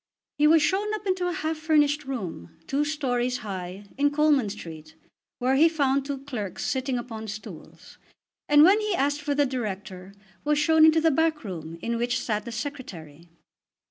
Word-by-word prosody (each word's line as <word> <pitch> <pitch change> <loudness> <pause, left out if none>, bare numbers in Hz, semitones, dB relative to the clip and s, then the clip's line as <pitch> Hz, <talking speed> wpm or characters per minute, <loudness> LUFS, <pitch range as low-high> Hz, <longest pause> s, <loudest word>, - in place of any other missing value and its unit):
He 300 - +5
was 315 0 +5
shown 400 +6 +1
up 425 - -8
into 370 -2 0
a - - -1
half 315 -1 -2
furnished 300 -1 +2
room, 175 - -6
two 280 +2 0
stories 250 -5 -1
high, 190 0 -6 0.2
in 290 0 +4
Coleman 290 -6 +2
Street, 160 -6 -9 0.4
where 255 +2 +1
he 320 +4 +6
found 275 -3 0
two 275 -2 -4
clerks 230 -9 -5
sitting 260 -1 -1
upon 225 -2 -6
stools; 210 +1 -10 0.5
and 295 0 +7
when 395 +6 +6
he 425 -3 0
asked 290 0 0
for 290 -1 -1
the 290 0 +3
Director 195 -6 -5 0.3
was 300 0 +1
shown 315 +1 +5
into 320 0 +5
the 325 0 +4
back 315 +1 +1
room 165 -5 -7
in 235 0 -1
which 240 +1 0
sat 210 -2 -2
the 235 - -6
Secretary. 180 - -7
270 Hz, 175 wpm, -26 LUFS, 210-305 Hz, 0.5 s, and